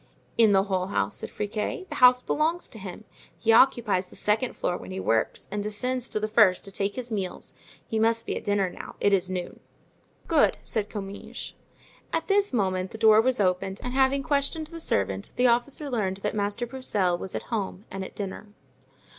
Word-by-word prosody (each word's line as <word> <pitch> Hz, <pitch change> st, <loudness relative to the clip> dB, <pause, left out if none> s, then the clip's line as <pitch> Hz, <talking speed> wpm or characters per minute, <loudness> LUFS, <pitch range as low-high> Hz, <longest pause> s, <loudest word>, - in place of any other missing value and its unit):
"In 225 Hz, -2 st, +5 dB
the 195 Hz, -1 st, +4 dB
whole 190 Hz, -2 st, -1 dB
house," 200 Hz, -, -1 dB
said -, -, -3 dB
Friquet; 210 Hz, -, -3 dB
"the -, -, -5 dB
house 250 Hz, 0 st, +7 dB
belongs 325 Hz, +4 st, 0 dB
to 220 Hz, -, -11 dB
him; 190 Hz, +2 st, -8 dB, 0.3 s
he 225 Hz, -, +2 dB
occupies 225 Hz, -6 st, +4 dB
the -, -, -16 dB
second 220 Hz, +4 st, +1 dB
floor 175 Hz, -, -1 dB
when -, -, -8 dB
he 190 Hz, 0 st, -5 dB
works 115 Hz, -10 st, 0 dB
and 205 Hz, 0 st, -2 dB
descends 245 Hz, +5 st, -1 dB
to -, -, -1 dB
the 215 Hz, -, -1 dB
first 215 Hz, -4 st, +4 dB
to 195 Hz, -, -8 dB
take 200 Hz, +1 st, -2 dB
his 245 Hz, -2 st, -5 dB
meals; 195 Hz, -4 st, -4 dB, 0.3 s
he 220 Hz, -, -2 dB
must 230 Hz, +1 st, +2 dB
be -, -, -2 dB
at -, -, -5 dB
dinner 205 Hz, -2 st, +1 dB
now; 180 Hz, -, -9 dB
it 205 Hz, -, +3 dB
is 185 Hz, -1 st, +2 dB
noon." 180 Hz, -1 st, -4 dB, 0.7 s
"Good," -, -, +3 dB
said 215 Hz, -2 st, -2 dB
Comminges. 200 Hz, -1 st, -7 dB, 0.6 s
At 325 Hz, -, -1 dB
this 405 Hz, 0 st, +2 dB
moment 190 Hz, -5 st, 0 dB
the 220 Hz, -, -9 dB
door 220 Hz, -1 st, +6 dB
was 255 Hz, +1 st, +1 dB
opened, 190 Hz, 0 st, 0 dB
and 250 Hz, -, -4 dB
having 270 Hz, +1 st, +3 dB
questioned 285 Hz, +3 st, 0 dB
the 330 Hz, +2 st, -9 dB
servant 100 Hz, -, -1 dB
the 250 Hz, -, +2 dB
officer 250 Hz, +5 st, +2 dB
learned 210 Hz, -8 st, -1 dB
that 210 Hz, -, -1 dB
Master 205 Hz, +3 st, -1 dB
Broussel 210 Hz, -8 st, 0 dB
was 190 Hz, -, -6 dB
at -, -, -6 dB
home 200 Hz, -1 st, -3 dB
and 195 Hz, 0 st, -4 dB
at -, -, -9 dB
dinner. 200 Hz, +1 st, -5 dB
210 Hz, 200 wpm, -26 LUFS, 195-250 Hz, 0.7 s, house